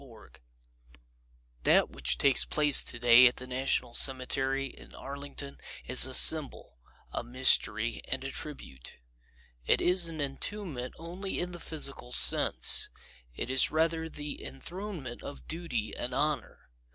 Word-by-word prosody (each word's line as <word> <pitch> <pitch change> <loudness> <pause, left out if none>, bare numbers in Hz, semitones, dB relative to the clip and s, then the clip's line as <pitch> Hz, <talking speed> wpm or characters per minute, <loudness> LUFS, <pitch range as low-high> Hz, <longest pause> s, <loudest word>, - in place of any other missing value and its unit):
O'Brien 115 -5 -18 1.3
That - - +1
which - - -2
takes 140 -2 +1
place 150 -2 +3
today 120 +1 +4
at 125 - -2
the 130 - -10
National 130 -2 -3
Cemetery 135 +1 -1
in 135 - -14
Arlington 140 0 -8 0.3
is 130 +1 +8
a 130 - -4
symbol, 145 - +6 0.3
a - - -6
mystery 130 +2 +2
and - - -4
a - - -7
tribute. 65 0 -9 0.7
It - - +2
is 180 -1 +2
an 160 -1 -8
entombment 145 -1 -6
only 180 +4 -8
in 180 0 -5
the 175 - -10
physical 140 -6 -3
sense. - - +2 0.5
It 125 - -6
is 130 -1 +4
rather 160 +1 -2
the 150 -2 -9
enthronement 170 -4 -9
of 140 - -12
Duty 155 -10 -5
and 125 +1 -6
Honor. 145 - -4
135 Hz, 135 wpm, -27 LUFS, 125-160 Hz, 1.3 s, is